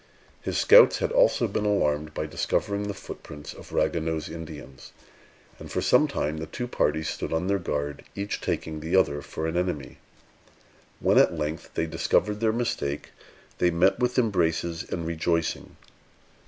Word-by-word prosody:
His - - -2
scouts - - +7
had 485 - -1
also - - +4
been 105 - -2
alarmed 75 -7 0
by - - -2
discovering 100 0 -1
the 100 - -2
footprints 75 -5 -9
of - - -13
Ragueneau's 80 -1 0
Indians; 75 -5 -9 0.7
and - - -10
for - - -1
some - - +4
time 75 +2 -2
the 80 +1 -5
two 125 -1 -5
parties 80 -9 0
stood - - -4
on 80 +2 0
their 100 +1 +1
guard, 75 -4 -3
each 100 +1 -3
taking 80 -1 -3
the 80 +4 -2
other 75 -6 +3
for 80 - -5
an 80 +1 -2
enemy. 85 -8 -2 1.0
When - - +4
at 85 - +4
length 75 +1 -4
they 80 - +1
discovered 105 +5 +1
their 110 -1 +2
mistake, 110 -12 -2 0.5
they 90 - +4
met 90 +5 +3
with 125 0 0
embraces 85 -7 +1
and 85 -2 -3
rejoicing. 85 0 -1
85 Hz, 160 wpm, -26 LUFS, 75-100 Hz, 1.0 s, scouts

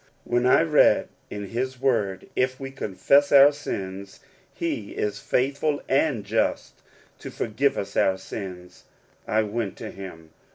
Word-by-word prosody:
When 120 +1 +1
I 130 - +5
read 155 -2 +4 0.2
in 105 0 -6
his 130 +2 -3
word, 110 -8 0
" - - -36
If 130 0 -10
v/e 135 0 -7
confess 135 +4 +2
our 140 0 +8
sins, 100 -9 -6 0.3
he 120 -11 -4
is 105 - -2
faithful 140 +3 0
and 135 -6 +1
just 110 +3 -1 0.4
to - - -8
forgive 135 +5 -1
us 100 0 -5
our 95 0 +2
sins," 90 -2 -9 0.4
I 110 0 +2
went 105 -1 -3
to - - -7
him. 80 -5 -10
115 Hz, 150 wpm, -25 LUFS, 100-135 Hz, 0.4 s, our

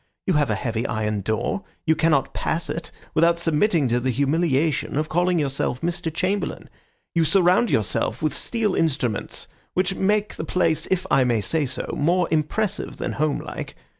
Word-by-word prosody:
You 185 - +2
have 150 -4 +2
a 105 - +1
heavy 115 +1 -2
iron 105 -2 -1
door. 110 - -1 0.2
You 160 -1 +3
cannot 155 -3 +2
pass 165 +2 -1
it 165 - -5 0.2
without 170 +1 +4
submitting 165 -1 +2
to 120 +1 +2
the 130 +2 -1
humiliation 140 0 +1
of 155 +1 -1
calling 175 +1 +2
yourself 135 -4 -1
Mr. 170 -1 -2
Chamberlain. 195 +4 -2 0.4
You 165 - +3
surround 185 +5 +4
yourself 110 - 0
with 155 -3 +1
steel 220 +4 0
instruments 130 -9 -1 0.3
which 185 +1 +1
make 205 +2 0
the - - -3
place, 165 -3 +1
if 185 -1 0
I 135 - +5
may 120 -3 +2
say 150 +7 0
so, 130 - -4
more 175 +4 +2
impressive 190 +7 -1
than - - -3
homelike. 150 -1 -3
160 Hz, 165 wpm, -23 LUFS, 135-180 Hz, 0.4 s, I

